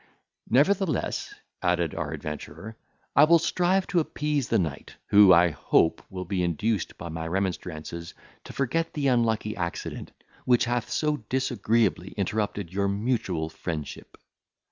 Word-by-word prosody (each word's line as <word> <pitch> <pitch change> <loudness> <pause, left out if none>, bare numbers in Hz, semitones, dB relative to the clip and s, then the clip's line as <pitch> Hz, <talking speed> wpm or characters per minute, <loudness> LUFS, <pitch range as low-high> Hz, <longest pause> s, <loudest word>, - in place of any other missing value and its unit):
"Nevertheless," 180 - +1 0.3
added 85 -2 +1
our 75 -3 -3
adventurer, 80 +6 -7 0.4
"I 145 - +8
will 170 +2 +6
strive 180 +3 +1
to 175 - +3
appease 150 -4 -1
the - - +3
knight, 80 -5 -3
who, 100 -2 +8
I 85 0 +6
hope, 80 +2 +2
will 90 -1 -6
be 95 -3 -1
induced 90 +3 -1
by 85 - -7
my 80 0 -4
remonstrances 85 -2 -4 0.3
to - - -8
forget 150 +5 -1
the 140 -3 +1
unlucky 110 -3 +1
accident, 85 -2 -5 0.3
which 125 -1 +3
hath 120 -1 -1
so 150 -1 0
disagreeably 115 - 0
interrupted 100 -2 -2
your 100 +1 +1
mutual 100 -6 -1
friendship." 80 -2 -6
100 Hz, 135 wpm, -26 LUFS, 85-130 Hz, 0.4 s, I